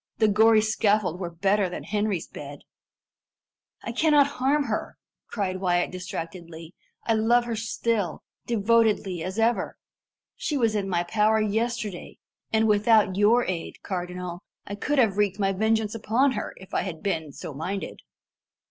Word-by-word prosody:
The 220 - +4
gory 220 +1 +5
scaffold 210 -4 +1
were 175 -3 -3
better 195 +3 +1
than 175 - -6
Henry's 210 -4 -1
bed." 145 0 -9 1.2
"I - - -4
cannot 300 -3 +4
harm 285 +1 +1
her," - - -4 0.3
cried 190 -4 -2
Wyat 175 -2 +1
distractedly. 170 -2 -7 0.3
"I 225 - +2
love 235 +2 +3
her 235 -1 -3
still, 225 -4 -2 0.2
devotedly 220 -5 +2
as 185 +4 -5
ever. 230 +1 +1 0.6
She 295 - -2
was 230 -4 +2
in 200 -2 -1
my 175 -2 +1
power 215 +4 +2
yesterday, 215 -2 -2 0.3
and 220 0 +3
without 210 -2 +4
your 220 +5 +4
aid, 175 -3 -5
cardinal, 180 -1 -5 0.2
I 200 - -6
could 290 +8 -1
have 220 -7 +3
wreaked 205 -2 +1
my 195 -1 +1
vengeance 220 +1 +1
upon 230 +5 +2
her, 210 -4 -4
if 190 - -14
I - - +1
had 175 -3 -6
been 160 -7 -2
so 145 - -8
minded." 185 +7 -5
210 Hz, 150 wpm, -26 LUFS, 185-225 Hz, 1.2 s, gory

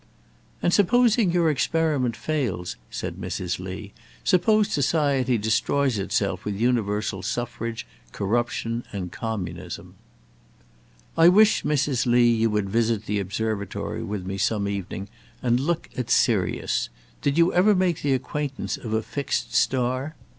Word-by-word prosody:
"And 175 - +2
supposing 230 0 +4
your 170 -2 +3
experiment 145 -4 +1
fails," 120 - -2
said - - -5
Mrs. 90 -1 -3
Lee; 95 +2 -7 0.3
"suppose 210 +3 +3
society 140 -4 +2
destroys 110 +3 +1
itself 95 - -1
with 105 -1 -3
universal 105 -4 0
suffrage, 115 +1 -4 0.3
corruption, 115 - -1
and 90 -3 -5
communism." 90 -6 -5 1.2
"I 165 +1 +6
wish, 210 +4 +5
Mrs. 140 -4 0
Lee, 120 0 +5
you 115 0 +2
would 105 -2 0
visit 110 +1 0
the 105 -1 -1
Observatory 100 +1 -3
with 100 -3 -4
me 95 +1 -4
some 105 -1 +1
evening, 100 -1 -4 0.4
and 120 -1 +3
look 165 +5 -1
at 125 -2 -3
Sirius. 100 -10 +1 0.3
Did 140 +2 0
you 170 +1 +4
ever 200 +4 +5
make 180 -3 +1
the 140 -2 +1
acquaintance 140 +2 -3
of 110 -2 -6
a 110 0 +1
fixed 140 +4 -3
star? 130 +4 +1
120 Hz, 130 wpm, -25 LUFS, 105-150 Hz, 1.2 s, I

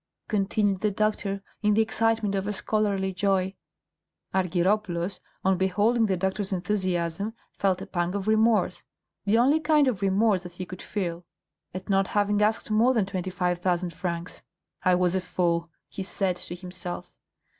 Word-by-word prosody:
continued 200 -1 +1
the 210 - +2
doctor, 200 -1 -1 0.2
in 210 -1 +3
the 225 - +5
excitement 225 -2 +1
of 195 0 -1
a 210 - -1
scholarly 200 -2 0
joy. 190 0 +1 0.8
Argyropoulos, 185 0 0 0.3
on 190 -1 +3
beholding 210 +5 +3
the 190 -2 +1
doctor's 190 +2 -1
enthusiasm, 185 +1 -1 0.2
felt 190 -2 0
a - - -6
pang 175 +2 -2
of 200 0 -3
remorse, 220 0 +3 0.4
the 210 +2 +3
only 275 +6 +4
kind 300 -2 +4
of 225 -8 0
remorse 195 0 +3
that 175 -1 -10
he 185 +1 -6
could 185 0 -9
feel, 175 -4 -3 0.5
at 185 +1 -7
not 195 -1 +2
having 205 0 +1
asked 215 +1 +1
more 235 +4 +4
than 215 -4 +3
twenty 185 -1 -3
five 180 -1 -1
thousand 180 -1 0
francs. 175 -1 -4 0.4
"I 185 0 +5
was 180 -1 +2
a 190 - +1
fool!" 170 -2 0 0.2
he - - -7
said 190 -1 0
to 175 - -7
himself. 180 -1 -7
195 Hz, 165 wpm, -27 LUFS, 180-210 Hz, 0.8 s, the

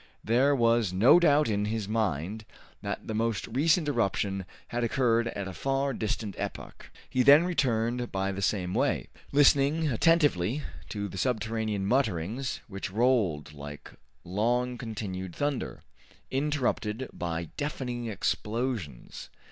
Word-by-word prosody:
There 130 +6 +3
was 115 -5 +3
no 110 - +6
doubt 150 -3 +4
in 105 -2 0
his 110 -1 -2
mind 105 -1 -1 0.4
that - - -4
the 110 - -4
most 110 -2 0
recent 155 +7 +2
eruption 100 -7 0 0.2
had 120 0 -2
occurred 120 -1 +2
at 100 -4 -4
a 95 - -6
far 135 +4 -1
distant 110 -2 -3
epoch. - - -6 0.2
He 130 - +1
then 145 +5 +8
returned 125 -7 0
by 95 0 -1
the 100 0 -5
same 95 -2 0
way, - - 0 0.2
listening 145 +2 +4
attentively 140 - +2 0.3
to 100 -1 -3
the 95 - -6
subterranean 110 -2 -1
mutterings 115 +1 0
which 100 -2 -5
rolled 100 - +1
like 75 0 -9 0.3
long 120 +7 0
continued 100 -6 -5
thunder, 145 -3 -2 0.5
interrupted 130 -4 -1
by 85 -2 -4
deafening 125 -5 -3
explosions. 110 - -3
115 Hz, 130 wpm, -28 LUFS, 100-130 Hz, 0.5 s, then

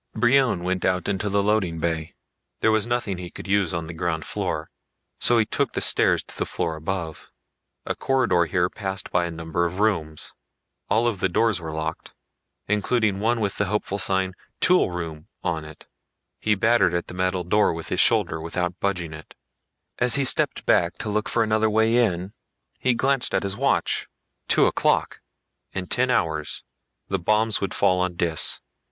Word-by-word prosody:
Brion 120 -4 +3
went 90 0 -1
out 90 -2 0
into 100 +1 -1
the 100 0 +1
loading 100 -6 +1
bay. 80 -1 -2 0.5
There 110 - +4
was 110 +1 +1
nothing 120 -6 -1
he 90 -1 -6
could - - -10
use 100 -3 +2
on 85 -2 -3
the 85 - -7
ground 80 -1 -2
floor, - - -3 0.5
so 120 - +4
he 110 - +3
took - - -1
the - - -1
stairs - - +4
to - - -12
the - - -2
floor 85 -3 -2
above. 80 0 -5 0.6
A - - -1
corridor 125 -10 +2
here 90 +1 +1
passed 95 0 -5
by 90 -1 +2
a - - -3
number 85 +1 -2
of 85 +2 -2
rooms. 80 -8 -1 0.6
All 115 +2 +3
of 110 -5 -1
the 95 - +1
doors 110 0 +1
were 80 -1 -5
locked, 80 0 -5 0.5
including 105 0 +1
one 115 +3 +1
with 100 -2 -1
the 100 - +1
hopeful 100 0 -2
sign 95 -1 +2 0.3
TOOL 180 - +4
ROOM 80 -3 -6 0.2
on 80 -3 -1
it. 80 0 -13 0.5
He 105 -1 +2
battered 110 -4 +3
at 85 - -1
the - - -10
metal 90 0 -1
door 105 +5 +3
with 80 0 -5
his - - -1
shoulder 80 - +3
without 90 +2 -3
budging 90 -5 -2
it. 80 0 -12 0.6
As 125 -1 +4
he 140 - +2
stepped 130 - +1
back 85 0 +2
to 115 -2 -4
look 105 +1 -1
for 115 - +2
another 110 0 +2
way 110 +2 +3
in, 95 -4 0 0.5
he 125 -1 +2
glanced 135 +1 0
at - - +1
his 100 0 -1
watch. 140 +5 0 0.4
Two - - +4
o'clock! - - +1 0.5
In 95 -1 -3
ten 125 +6 +1
hours 80 -10 -1 0.4
the 95 - -1
bombs 110 +4 +2
would 100 -2 -2
fall 90 0 +3
on 90 -1 -1
Dis. 80 -3 +1
95 Hz, 185 wpm, -24 LUFS, 85-110 Hz, 0.6 s, There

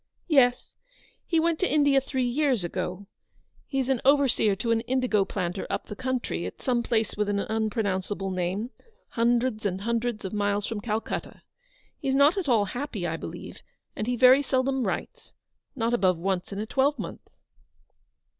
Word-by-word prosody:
" - - -44
Yes. 245 -1 +1 0.5
He 330 - +2
went 330 0 +1
to 375 - +1
India 285 -2 +4
three 260 -1 -1
years 255 -4 +1
ago. 180 +2 -4 0.6
He's 270 -3 -1 0.2
overseer 270 -7 +4
to 230 +4 -2
an 225 0 +2
indigo 240 -4 +1
planter 185 -1 -3
up - - -2
the 210 - -7
country, 245 - -2
at 90 - -9
some 245 -2 +1
place 225 -2 0
with 210 0 0
an 205 - 0
unpronounceable 205 -3 -1
name, 185 +6 -2 0.4
hundreds 235 -1 +1
and 190 -2 -1
hundreds 230 -1 -1
of 190 - -5
miles 205 0 0
from 220 -2 -4
Calcutta. 215 +1 -4 0.6
He's 265 0 0
not 285 +4 +5
at 370 -8 -2
all 220 -4 +4
happy, 240 -4 -4
I 165 -1 -1
believe, - - -8 0.3
and 215 - -3
he 245 - +1
very 255 +3 +7
seldom 265 -1 0
writes - - -5 0.2
— - - -51
not 230 -2 0
above 185 -7 +3
once 185 +2 -2
in 195 - -5
a 210 - -2
twelvemonth." 275 +5 -1
230 Hz, 165 wpm, -27 LUFS, 200-260 Hz, 0.6 s, very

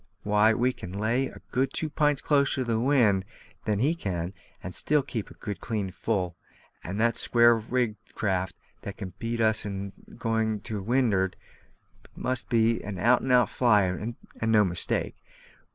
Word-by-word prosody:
Why, 105 +1 +4
we 125 +2 +1
can 90 - -9
lay 115 +6 0
a - - -12
good 130 +1 0
two 160 - -1
pints 150 -1 +1
closer 140 -2 +2
to 130 - 0
the 115 -2 0
wind 115 -7 +3 0.4
than 105 -2 +1
he 140 +9 +2
can, 90 - -3 0.3
and 95 - -6
still 150 -1 +2
keep 115 -6 -5
a - - -14
good 100 -2 -6
clean 105 -5 -2
full; 90 -5 -2 0.5
and 95 +5 -4
the 115 +1 +4
square 120 0 +4
rigged 115 -1 -2
craft 95 -3 -1 0.2
that 100 - -7
can 95 -4 -6
beat 115 0 -2
us 110 -1 +3
in 100 -1 -5 0.2
going 110 -2 0
to 105 -2 -4
wind'ard 105 -4 +1 0.8
must 130 -1 -3
be 115 0 +3
an 105 -2 -5
out 120 +6 +4
and 130 - -1
out 125 -1 +4
flyer, 105 -7 +3
and 110 +1 -5
no 105 -2 +5
mistake. 90 -2 -2
110 Hz, 170 wpm, -27 LUFS, 100-125 Hz, 0.8 s, no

